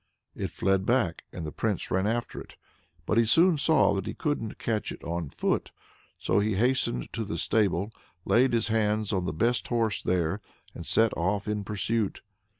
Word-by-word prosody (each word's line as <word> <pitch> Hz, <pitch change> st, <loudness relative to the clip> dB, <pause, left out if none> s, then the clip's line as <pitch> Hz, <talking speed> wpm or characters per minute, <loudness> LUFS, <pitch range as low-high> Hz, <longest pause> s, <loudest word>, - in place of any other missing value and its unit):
It -, -, -4 dB
fled 95 Hz, 0 st, +1 dB
back, 105 Hz, -7 st, 0 dB
and 85 Hz, -, -6 dB
the 75 Hz, -, -5 dB
Prince 105 Hz, +2 st, -2 dB
ran 95 Hz, +2 st, +1 dB
after 115 Hz, +1 st, -2 dB
it. -, -, -13 dB, 0.5 s
But 110 Hz, -, +2 dB
he 115 Hz, -, +4 dB
soon 165 Hz, +7 st, +4 dB
saw 155 Hz, -6 st, +4 dB
that 95 Hz, -1 st, -3 dB
he -, -, -4 dB
couldn't 145 Hz, -8 st, -2 dB
catch 110 Hz, -3 st, -2 dB
it -, -, -9 dB
on 85 Hz, -3 st, -3 dB
foot, -, -, -1 dB, 0.5 s
so 95 Hz, -, +1 dB
he 105 Hz, 0 st, +1 dB
hastened 115 Hz, -, 0 dB
to 115 Hz, -, -2 dB
the 85 Hz, -5 st, -4 dB
stable, 100 Hz, +1 st, +1 dB, 0.3 s
laid 125 Hz, +1 st, +3 dB
his 115 Hz, -1 st, +1 dB
hands 110 Hz, -1 st, +1 dB
on 95 Hz, -2 st, 0 dB
the -, -, -1 dB
best 115 Hz, +10 st, 0 dB
horse 115 Hz, -3 st, 0 dB
there, 90 Hz, +1 st, 0 dB, 0.3 s
and -, -, -8 dB
set 115 Hz, 0 st, +3 dB
off 100 Hz, +4 st, -1 dB
in 105 Hz, -1 st, -1 dB
pursuit. 105 Hz, +1 st, -2 dB
105 Hz, 185 wpm, -28 LUFS, 95-115 Hz, 0.5 s, he